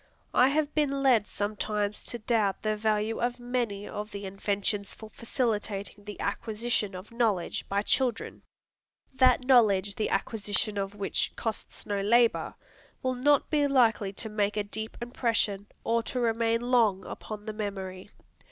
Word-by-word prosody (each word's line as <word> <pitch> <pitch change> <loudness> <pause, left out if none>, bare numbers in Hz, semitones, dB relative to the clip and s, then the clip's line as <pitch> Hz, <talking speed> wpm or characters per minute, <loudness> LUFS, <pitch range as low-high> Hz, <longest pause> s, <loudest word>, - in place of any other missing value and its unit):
I 250 - +6
have 300 +1 +1
been 280 -2 +1
led 235 -6 +4
sometimes 210 0 -2
to 240 - -4
doubt 215 -4 0
the 215 0 +1
value 215 +1 0
of 245 +1 -1
many 240 -5 -2
of 210 +1 -5
the 200 -1 -7
inventions 200 +1 -2
for 220 -1 -11
facilitating 210 -4 -2
the 210 -1 -8
acquisition 215 -1 -1
of 185 +4 -9
knowledge 225 -7 0
by 200 +1 +1
children. 245 0 0 0.7
That 255 -1 +5
knowledge 205 -6 +4
the 215 - -1
acquisition 205 -1 -1
of 195 +1 -3
which 200 -1 -1
costs 225 -2 -4
no 200 -1 -1
labor, 235 +3 +3 0.5
will 255 0 +1
not 280 +3 +2
be 295 -2 +3
likely 230 -7 +3
to 220 - -4
make 210 -1 0
a 210 - +1
deep 220 +2 -5
impression, 230 -4 0 0.2
or 230 +1 +2
to 250 - -4
remain 230 -1 +1
long 215 -6 +3
upon 210 -1 -7
the 215 - -4
memory. 195 -3 -5
215 Hz, 150 wpm, -28 LUFS, 205-240 Hz, 0.7 s, I